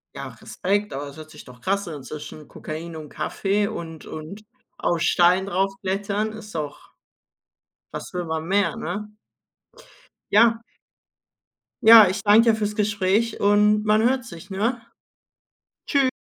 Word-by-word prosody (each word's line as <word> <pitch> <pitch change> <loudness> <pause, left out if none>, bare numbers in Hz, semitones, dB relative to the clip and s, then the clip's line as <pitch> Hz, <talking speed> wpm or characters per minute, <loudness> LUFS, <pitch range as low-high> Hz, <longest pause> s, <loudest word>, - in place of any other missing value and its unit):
Ja, - - -6
Respekt, 205 +2 -2
aber 140 +2 -5
das 140 +1 -11
hört 155 0 -11
sich - - -13
doch 125 -2 -15
krass 200 +5 -1
an. 150 -5 -7
Zwischen 150 +1 -9
Kokain 160 +2 -7
und 155 -2 -8
Kaffee 200 +6 -1
und 165 -7 -7
und 160 +8 -8 0.3
auf 170 - 0
Steinen 180 +2 +3
draufklettern 195 +2 -2
ist 215 -2 -11
doch 150 -2 -6 1.0
was - - -7
will 180 -1 -3
man 160 0 -3
mehr, 195 -3 +1
ne? 210 +6 -5 1.2
Ja. 230 +2 +5 1.2
Ja, 220 -3 +9
ich 195 +1 -3
danke 225 +3 +6
dir - - 0
fürs 210 -1 -2
Gespräch 210 +1 0
und 210 +1 +3
man 215 +1 +3
hört 255 +1 +1
sich, 180 -2 -11
ne? 225 +5 -1 1.1
Tschü 275 -2 +3
200 Hz, 140 wpm, -23 LUFS, 165-215 Hz, 1.2 s, Ja